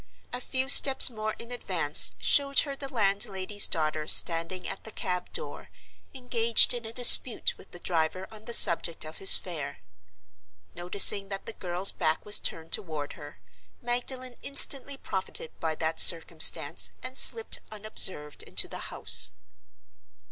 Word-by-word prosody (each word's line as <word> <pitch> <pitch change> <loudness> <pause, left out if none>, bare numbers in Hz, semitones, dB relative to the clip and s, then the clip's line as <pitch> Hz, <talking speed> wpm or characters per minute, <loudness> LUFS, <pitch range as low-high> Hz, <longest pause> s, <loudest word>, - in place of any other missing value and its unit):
A 245 - -7
few 260 +1 -5
steps 270 -1 +8
more 215 -1 -7
in 235 +1 -12
advance 180 -11 +1
showed 280 -1 0
her 280 -2 -8
the 275 0 -10
landlady's 205 -3 -1
daughter 155 -1 -4
standing 170 +2 +1
at - - -9
the 220 - -11
cab 180 -3 -7
door 475 - -7 0.5
engaged 235 -3 +1
in 240 -2 -8
a - - -9
dispute 245 0 +5
with - - -19
the - - -13
driver 175 +2 -5
on 215 -1 -17
the 235 - -9
subject 170 -5 +2
of 155 +1 -12
his 195 - +7
fare. 160 - -10 1.0
Noticing 195 +3 +2
that 195 -1 -8
the - - -9
girl's 180 +1 0
back 160 -3 -4
was 210 0 +3
turned 165 0 -4
toward 155 -5 -4
her, 145 -2 -15 0.4
Magdalen 250 +1 -6
instantly 275 0 -2
profited 190 -8 -9
by 160 -1 -5
that 160 0 -5
circumstance 165 -2 +3
and 255 0 -10
slipped 450 - +1
unobserved 195 -8 -5
into - - -2
the - - -11
house. - - 0
195 Hz, 150 wpm, -24 LUFS, 165-245 Hz, 1.0 s, steps